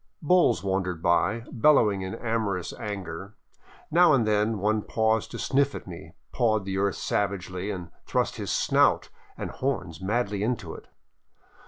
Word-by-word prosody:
Bulls 175 Hz, -, +3 dB
wandered 95 Hz, -3 st, -2 dB
by, 105 Hz, +6 st, +2 dB
bellowing 110 Hz, -6 st, +4 dB
in 95 Hz, 0 st, -4 dB
amorous 110 Hz, -6 st, -2 dB
anger. 100 Hz, -1 st, -6 dB, 0.6 s
Now 175 Hz, 0 st, +6 dB
and 125 Hz, -5 st, +3 dB
then 105 Hz, +1 st, +1 dB
one 105 Hz, +2 st, +1 dB
paused 110 Hz, 0 st, 0 dB
to -, -, -7 dB
sniff 140 Hz, 0 st, +1 dB
at -, -, -7 dB
me, 85 Hz, -1 st, -10 dB, 0.2 s
pawed 110 Hz, -5 st, +1 dB
the 95 Hz, 0 st, -2 dB
earth 100 Hz, -1 st, +1 dB
savagely, 95 Hz, -1 st, -2 dB
and 90 Hz, -5 st, -5 dB, 0.2 s
thrust -, -, 0 dB
his -, -, -4 dB
snout -, -, +2 dB, 0.3 s
and -, -, -5 dB
horns 95 Hz, -, -3 dB
madly 105 Hz, 0 st, -1 dB
into 115 Hz, +2 st, -2 dB
it. -, -, -12 dB
105 Hz, 150 wpm, -26 LUFS, 95-115 Hz, 0.6 s, Now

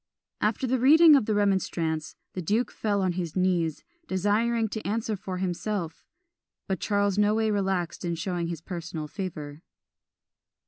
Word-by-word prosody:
After 215 Hz, +4 st, +1 dB
the 255 Hz, 0 st, +1 dB
reading 310 Hz, +5 st, +8 dB
of 265 Hz, -7 st, +2 dB
the 215 Hz, -, +1 dB
Remonstrance, 175 Hz, -6 st, 0 dB, 0.2 s
the 185 Hz, -, -4 dB
duke 215 Hz, +8 st, 0 dB
fell 205 Hz, -2 st, -1 dB
on 185 Hz, -, +2 dB
his 175 Hz, -3 st, -4 dB
knees, 180 Hz, -4 st, +1 dB, 0.2 s
desiring 220 Hz, +4 st, +1 dB
to 220 Hz, -, -4 dB
answer 220 Hz, +1 st, -1 dB
for 190 Hz, -1 st, -5 dB
himself; 180 Hz, -1 st, -3 dB, 0.6 s
but 190 Hz, -3 st, -1 dB
Charles 200 Hz, 0 st, +1 dB
no 210 Hz, +1 st, +3 dB
way 220 Hz, -1 st, +1 dB
relaxed 190 Hz, -4 st, -1 dB
in 170 Hz, -1 st, -1 dB
showing 175 Hz, 0 st, -2 dB
his 165 Hz, -2 st, -5 dB
personal 165 Hz, -3 st, -5 dB
favour. 155 Hz, -4 st, -6 dB
190 Hz, 150 wpm, -27 LUFS, 170-215 Hz, 0.6 s, reading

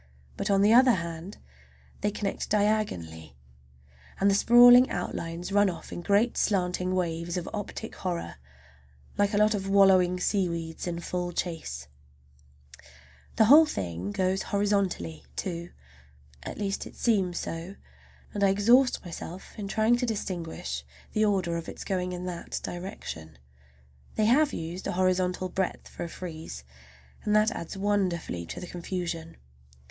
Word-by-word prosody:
But, -, -, -3 dB
on 200 Hz, 0 st, +4 dB
the 210 Hz, +2 st, +5 dB
other 250 Hz, +1 st, +7 dB
hand, 170 Hz, +1 st, -5 dB, 0.6 s
they 205 Hz, -, +1 dB
connect 205 Hz, -1 st, -3 dB
diagonally, 90 Hz, -, -1 dB, 0.8 s
and 200 Hz, +1 st, +4 dB
the -, -, +3 dB
sprawling 245 Hz, +4 st, +8 dB
outlines 170 Hz, 0 st, -4 dB
run 205 Hz, 0 st, +4 dB
off 175 Hz, -, -8 dB
in -, -, -5 dB
great 205 Hz, +6 st, +2 dB
slanting 185 Hz, -2 st, 0 dB
waves 170 Hz, 0 st, -2 dB
of 180 Hz, -, -4 dB
optic 215 Hz, +1 st, -5 dB
horror, 170 Hz, -, -4 dB, 0.8 s
like 205 Hz, +1 st, +2 dB
a -, -, +2 dB
lot 210 Hz, +1 st, +4 dB
of 195 Hz, -2 st, -3 dB
wallowing 190 Hz, -2 st, +5 dB
seaweeds 170 Hz, -4 st, -1 dB
in 170 Hz, -1 st, -3 dB
full 180 Hz, +1 st, -3 dB
chase. 160 Hz, -, -4 dB, 1.5 s
The 220 Hz, -, +5 dB
whole 305 Hz, +7 st, +8 dB
thing 90 Hz, -, -4 dB
goes 185 Hz, -, 0 dB
horizontally, 195 Hz, -, -1 dB
too, 170 Hz, -1 st, -4 dB, 0.7 s
at -, -, -7 dB
least 200 Hz, -1 st, -2 dB
it -, -, -13 dB
seems 195 Hz, -7 st, +1 dB
so, 165 Hz, +4 st, -5 dB, 0.6 s
and 205 Hz, -, -1 dB
I 195 Hz, -, +5 dB
exhaust 235 Hz, +7 st, +4 dB
myself 175 Hz, +1 st, -8 dB
in 205 Hz, -3 st, -5 dB
trying 220 Hz, +4 st, +3 dB
to 245 Hz, 0 st, -1 dB
distinguish 170 Hz, -, -4 dB, 0.3 s
the 215 Hz, 0 st, +3 dB
order 185 Hz, -5 st, +1 dB
of 165 Hz, -, -6 dB
its -, -, -7 dB
going 180 Hz, -1 st, -2 dB
in 180 Hz, 0 st, -5 dB
that 175 Hz, -2 st, -4 dB
direction. 175 Hz, -, -7 dB, 0.8 s
They 215 Hz, -, +2 dB
have 280 Hz, +6 st, +4 dB
used 170 Hz, +3 st, -5 dB
a -, -, -2 dB
horizontal 185 Hz, 0 st, +1 dB
breadth 190 Hz, 0 st, -2 dB
for -, -, -7 dB
a 170 Hz, -, -5 dB
frieze, 160 Hz, -, -7 dB, 0.6 s
and 210 Hz, -, +1 dB
that 215 Hz, +1 st, +4 dB
adds 170 Hz, -3 st, -6 dB
wonderfully 185 Hz, -, -1 dB
to -, -, -6 dB
the -, -, -6 dB
confusion. 170 Hz, -2 st, -5 dB
185 Hz, 145 wpm, -28 LUFS, 170-205 Hz, 1.5 s, sprawling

